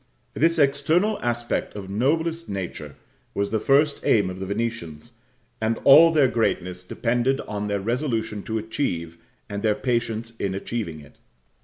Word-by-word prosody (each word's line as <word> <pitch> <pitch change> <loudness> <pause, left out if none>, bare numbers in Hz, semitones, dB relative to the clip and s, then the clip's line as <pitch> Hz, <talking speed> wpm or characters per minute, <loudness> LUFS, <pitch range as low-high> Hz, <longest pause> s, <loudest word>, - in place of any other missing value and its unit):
This 165 +2 +2
external 155 +9 +2
aspect 120 -2 -2
of 100 -2 -6
noblest 160 - 0
nature 95 -3 -5 0.4
was 100 0 -1
the 110 - +1
first 145 +5 +3
aim 100 -5 +3
of 90 - -8
the 95 - -4
Venetians, 105 -4 -4 0.5
and 110 +1 +1
all 160 +4 +8
their 150 -4 +4
greatness 90 -7 -1
depended 120 +7 0
on 105 0 -4
their 100 -1 -1
resolution 115 -2 -2
to 110 - -2
achieve, 90 - -3 0.3
and 100 -1 -5
their 105 -1 +2
patience 115 -2 -2
in 95 -1 -1
achieving 95 -6 -4
it. 70 - -17
115 Hz, 150 wpm, -24 LUFS, 100-135 Hz, 0.5 s, all